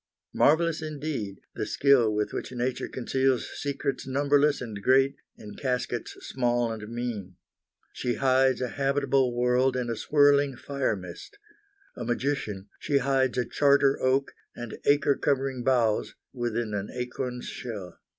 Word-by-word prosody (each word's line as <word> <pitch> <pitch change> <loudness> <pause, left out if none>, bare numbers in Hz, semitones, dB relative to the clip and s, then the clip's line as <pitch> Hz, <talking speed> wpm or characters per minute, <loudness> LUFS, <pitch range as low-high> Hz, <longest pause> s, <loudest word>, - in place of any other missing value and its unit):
Marvelous, 165 +1 +3
indeed, 145 -10 -4
the - - -3
skill 135 -6 +4
with 105 0 -1
which - - -4
nature 125 0 -2
conceals 130 0 0
secrets 140 -1 -3
numberless 145 +2 +2
and 110 -5 -6
great 135 +4 +4 0.2
in 105 -1 -10
caskets 125 -3 -3
small 120 -2 0
and 110 -1 -6
mean. 115 -6 -4 0.6
She 120 -1 -2
hides 130 -1 +3
a 125 - -1
habitable 135 -1 +1
world 125 +2 +2
in 120 -2 -2
a - - -2
swirling 145 +2 +3
fire 140 -2 -1
mist. 90 - -10 0.6
A 120 - -5
magician, 120 -5 -2
she 140 - +1
hides 135 -1 +1
a 125 - +1
charter 140 0 +3
oak 135 +1 +1 0.2
and 120 -2 -7
acre 145 0 +4
covering 135 -2 -1
boughs 120 -4 +1 0.2
within 120 -3 -2
an 100 0 -3
acorn's 125 0 -4
shell. 105 -7 -7
130 Hz, 140 wpm, -27 LUFS, 120-140 Hz, 0.6 s, skill